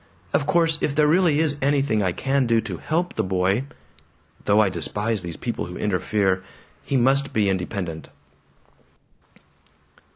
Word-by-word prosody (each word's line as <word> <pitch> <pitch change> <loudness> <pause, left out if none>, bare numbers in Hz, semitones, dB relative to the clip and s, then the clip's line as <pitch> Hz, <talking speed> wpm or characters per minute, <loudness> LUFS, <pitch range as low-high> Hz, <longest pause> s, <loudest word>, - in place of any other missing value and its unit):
"Of 145 - +1
course 165 -2 +2
if 140 - -1
there 150 - +4
really 165 0 +3
is 150 -2 0
anything 135 -5 +1
I 95 -2 +1
can 135 +6 0
do 115 -1 +3
to 100 -6 -6
HELP 170 - -2
the - - -1
boy 95 +6 0 0.8
"Though 105 +1 +4
I 105 - +5
despise 105 +5 -1
these 85 -2 -6
people 120 - -3
who 90 - -8
interfere. 95 -1 0 0.4
He 135 - 0
must 135 +2 +2
be 105 -2 +2
independent." 90 -3 -3
115 Hz, 150 wpm, -23 LUFS, 95-140 Hz, 0.8 s, I